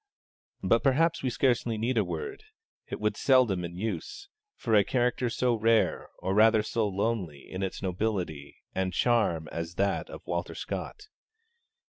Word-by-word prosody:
But -, -, +3 dB
perhaps 160 Hz, +5 st, +2 dB
we 130 Hz, -, 0 dB
scarcely 120 Hz, -3 st, +1 dB
need 120 Hz, +4 st, 0 dB
a 110 Hz, -, +3 dB
word 430 Hz, -1 st, -5 dB, 0.4 s
(it -, -, -5 dB
would -, -, +1 dB
be -, -, -11 dB
seldom 125 Hz, -9 st, +4 dB
in 85 Hz, 0 st, -6 dB
use) 110 Hz, -, -4 dB, 0.3 s
for 115 Hz, -, -2 dB
a 105 Hz, -2 st, +7 dB
character 125 Hz, +1 st, 0 dB
so 125 Hz, +1 st, +1 dB
rare, 115 Hz, 0 st, +2 dB
or 95 Hz, -, -2 dB
rather 110 Hz, +1 st, +5 dB
so 110 Hz, 0 st, 0 dB
lonely, 100 Hz, -7 st, -2 dB
in 95 Hz, -, -6 dB
its 95 Hz, +1 st, -3 dB
nobility 90 Hz, -6 st, -2 dB, 0.2 s
and 95 Hz, -1 st, -1 dB
charm 110 Hz, -10 st, +2 dB
as 85 Hz, +1 st, -5 dB
that 100 Hz, +2 st, 0 dB
of -, -, -10 dB
Walter -, -, -3 dB
Scott. 420 Hz, -, -5 dB
110 Hz, 160 wpm, -29 LUFS, 95-125 Hz, 0.4 s, a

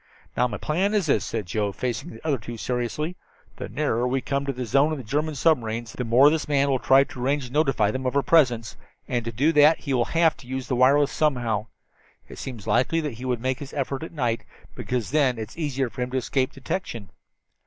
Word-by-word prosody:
"Now 125 Hz, -, +3 dB
my 105 Hz, -4 st, -5 dB
plan 190 Hz, -, 0 dB
is 200 Hz, -4 st, +2 dB
this," 150 Hz, -, +2 dB
said 110 Hz, -4 st, -3 dB
Joe, 105 Hz, +3 st, -1 dB
facing 120 Hz, +3 st, -3 dB
the 115 Hz, +6 st, -12 dB
other 140 Hz, -5 st, +1 dB
two 115 Hz, +2 st, -8 dB
seriously. 125 Hz, +9 st, -3 dB, 0.4 s
"The -, -, -6 dB
nearer 125 Hz, -3 st, 0 dB
we 130 Hz, +2 st, 0 dB
come 140 Hz, +2 st, -2 dB
to -, -, +1 dB
the 125 Hz, -1 st, -5 dB
zone 140 Hz, +7 st, +3 dB
of 155 Hz, -, -2 dB
the 130 Hz, -, -7 dB
German 150 Hz, +7 st, -1 dB
submarines, 120 Hz, -6 st, 0 dB
the 125 Hz, -, -4 dB
more 125 Hz, +5 st, +5 dB
this 160 Hz, 0 st, -1 dB
man 140 Hz, -1 st, +2 dB
will 130 Hz, -2 st, +1 dB
try 135 Hz, +2 st, +5 dB
to 130 Hz, -, -9 dB
arrange 140 Hz, +1 st, 0 dB
to 125 Hz, -, -11 dB
notify 135 Hz, -9 st, +2 dB
them 130 Hz, +2 st, -3 dB
of 125 Hz, -, -2 dB
our 140 Hz, -, +3 dB
presence, 125 Hz, -9 st, +3 dB, 0.3 s
and 120 Hz, -1 st, -1 dB
to 115 Hz, -, -3 dB
do 140 Hz, +9 st, +2 dB
that 150 Hz, +1 st, +5 dB
he 140 Hz, -, -2 dB
will 120 Hz, -2 st, +2 dB
have 165 Hz, -1 st, +2 dB
to 125 Hz, -, -15 dB
use 130 Hz, 0 st, -4 dB
the 125 Hz, -, 0 dB
wireless 140 Hz, +3 st, +4 dB
somehow. 120 Hz, -8 st, 0 dB, 0.6 s
It -, -, -11 dB
seems 120 Hz, -7 st, -7 dB
likely 165 Hz, +6 st, +2 dB
that 150 Hz, -4 st, -3 dB
he 130 Hz, -, -6 dB
would 125 Hz, -2 st, -1 dB
make 130 Hz, +1 st, -1 dB
his 140 Hz, -2 st, -9 dB
effort 135 Hz, -1 st, -2 dB
at 160 Hz, -, -7 dB
night, 120 Hz, -8 st, -1 dB, 0.3 s
because 125 Hz, -4 st, -3 dB
then 135 Hz, -5 st, +2 dB
it 110 Hz, 0 st, -6 dB
is -, -, -15 dB
easier 135 Hz, -4 st, -1 dB
for -, -, -7 dB
him 125 Hz, -, -1 dB
to 130 Hz, -, -2 dB
escape 130 Hz, +1 st, 0 dB
detection. 125 Hz, -, -5 dB
130 Hz, 240 wpm, -25 LUFS, 120-145 Hz, 0.6 s, more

